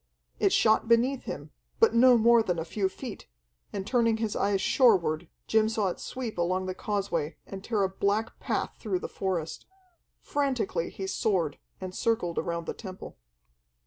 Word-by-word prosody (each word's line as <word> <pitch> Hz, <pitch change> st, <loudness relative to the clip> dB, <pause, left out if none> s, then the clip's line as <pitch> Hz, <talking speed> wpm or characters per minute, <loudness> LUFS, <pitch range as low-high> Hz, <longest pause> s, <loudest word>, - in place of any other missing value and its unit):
It -, -, +3 dB
shot 220 Hz, 0 st, +3 dB
beneath 240 Hz, +3 st, +2 dB
him, -, -, -6 dB, 0.3 s
but 455 Hz, -, +5 dB
no 245 Hz, +1 st, +7 dB
more 235 Hz, +1 st, +5 dB
than 180 Hz, -6 st, -1 dB
a 165 Hz, -, -3 dB
few 190 Hz, +3 st, -1 dB
feet, 235 Hz, +2 st, -8 dB, 0.4 s
and 195 Hz, -2 st, -4 dB
turning 230 Hz, -1 st, +2 dB
his 220 Hz, -2 st, -2 dB
eyes 200 Hz, -1 st, +1 dB
shoreward, 185 Hz, -, +3 dB, 0.2 s
Jim 220 Hz, 0 st, +3 dB
saw 215 Hz, -3 st, 0 dB
it -, -, -6 dB
sweep 245 Hz, -7 st, -5 dB
along 185 Hz, +2 st, 0 dB
the 185 Hz, -, -3 dB
causeway 190 Hz, -6 st, -2 dB
and 195 Hz, -1 st, -8 dB
tear 215 Hz, -4 st, 0 dB
a 190 Hz, -, +1 dB
black 205 Hz, +4 st, -1 dB
path -, -, -2 dB
through 200 Hz, -5 st, -1 dB
the -, -, -5 dB
forest. 180 Hz, -5 st, -3 dB, 0.5 s
Frantically 260 Hz, -12 st, -1 dB
he 195 Hz, -, -6 dB
soared, 185 Hz, -6 st, 0 dB, 0.2 s
and 185 Hz, -1 st, -6 dB
circled 185 Hz, -6 st, 0 dB
around 170 Hz, -1 st, -3 dB
the -, -, -3 dB
temple. 190 Hz, -4 st, -9 dB
200 Hz, 170 wpm, -28 LUFS, 185-230 Hz, 0.5 s, no